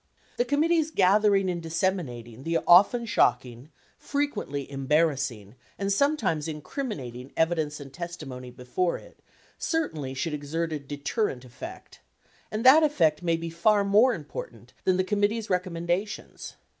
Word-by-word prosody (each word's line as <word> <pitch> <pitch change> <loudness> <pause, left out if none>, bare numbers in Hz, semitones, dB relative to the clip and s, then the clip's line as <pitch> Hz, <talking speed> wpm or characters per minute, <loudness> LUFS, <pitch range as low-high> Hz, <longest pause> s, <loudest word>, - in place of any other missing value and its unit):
The 245 - +2
committee's 315 +4 +2
gathering 200 -4 +3
and 175 -2 -2
disseminating 160 -9 -2
the 165 +3 0
often 205 +7 +6
shocking, 125 - +1 0.3
fre 285 0 0
quently 145 - -4
embarrassing, 135 -6 0 0.2
and 200 0 0
sometimes 200 - +1
incriminating 150 - -6
evidence 160 -2 0
and 140 -2 -10
testi 170 -1 -6
mony 125 -1 -8
before 125 +8 -2
it - - -16 0.4
certainly 155 - -2
should 150 +4 -2
exert 155 +3 -3
a 150 - -2
deterrent 145 - -3
effect; 125 - -10 0.5
and 215 +3 -3
that 280 +5 +9
effect 170 - +2
may 170 -2 +1
be 165 0 -5
far 205 +5 +3
more 215 +6 +4
important - - -9
than 185 -1 +3
the 185 - +2
committee's 210 +2 0
recommendations. 180 +2 -3
170 Hz, 135 wpm, -27 LUFS, 140-210 Hz, 0.5 s, that